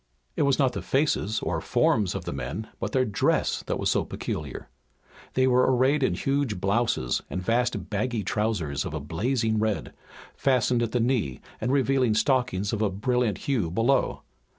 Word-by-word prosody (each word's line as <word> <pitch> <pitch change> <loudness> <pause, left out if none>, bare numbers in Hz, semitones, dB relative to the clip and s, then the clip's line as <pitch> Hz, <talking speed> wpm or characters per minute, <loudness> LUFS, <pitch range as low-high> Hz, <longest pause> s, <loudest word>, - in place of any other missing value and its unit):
It - - -1
was 140 -2 +3
not 130 -3 +2
the 100 - -4
faces 110 - 0
or - - -2
forms 105 -5 +1
of - - -5
the - - -3
men, 80 - -5
but - - -3
their 130 -1 +2
dress 105 -4 +1
that - - -1
was - - 0
so - - +2
peculiar. 75 -3 -5 0.7
They 130 - +4
were 125 0 +4
arrayed 130 +4 +3
in 130 - +2
huge 135 -8 -1
blouses 100 - 0
and 90 - -3
vast 120 +5 0
baggy 110 +1 -1
trousers 100 -9 -1
of 75 - -5
a - - -2
blazing 110 - 0
red, 110 -1 -1 0.4
fastened 125 -2 +2
at 115 -1 -1
the 125 - +1
knee 115 - 0 0.2
and 125 - 0
revealing 130 -4 +2
stockings 110 -4 +1
of 110 - -1
a 105 - +2
brilliant 115 +2 0
hue 125 - 0
below. 115 +10 +1
115 Hz, 175 wpm, -26 LUFS, 100-130 Hz, 0.7 s, They